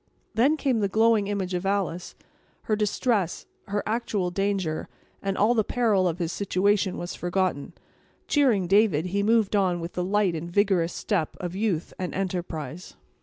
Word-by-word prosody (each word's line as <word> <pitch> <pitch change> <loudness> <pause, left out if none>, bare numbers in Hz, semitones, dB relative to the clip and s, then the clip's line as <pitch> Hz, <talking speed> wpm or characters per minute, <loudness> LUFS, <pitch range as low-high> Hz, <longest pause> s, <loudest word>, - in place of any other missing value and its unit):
Then 275 +7 +3
came 265 -6 +1
the 200 - +1
glowing 220 0 +3
image 195 -2 -2
of 180 0 -1
Alice; 195 -3 -2 0.5
her 215 - +1
distress; 210 -3 0 0.2
her 205 0 -1
actual 215 -5 -1
danger; 195 -4 -1 0.3
and 195 -1 -2
all 215 +4 +4
the 220 -3 +2
peril 210 -6 +2
of 170 -1 -1
his 170 -2 -2
situation 200 0 +1
was 175 - -5
forgotten. 175 -4 -1 0.5
Cheering 250 -10 +3
David, 190 -4 +3
he 195 +3 -1
moved 220 -1 +2
on 185 -3 +2
with 170 +1 -6
the 180 - -2
light 195 -1 +1
and 165 +1 -5
vigorous 190 -3 +2
step 180 -7 -2
of 180 0 -5
youth 195 -5 -1
and 180 -1 -3
enterprise. 175 -4 -4
195 Hz, 165 wpm, -26 LUFS, 175-210 Hz, 0.5 s, all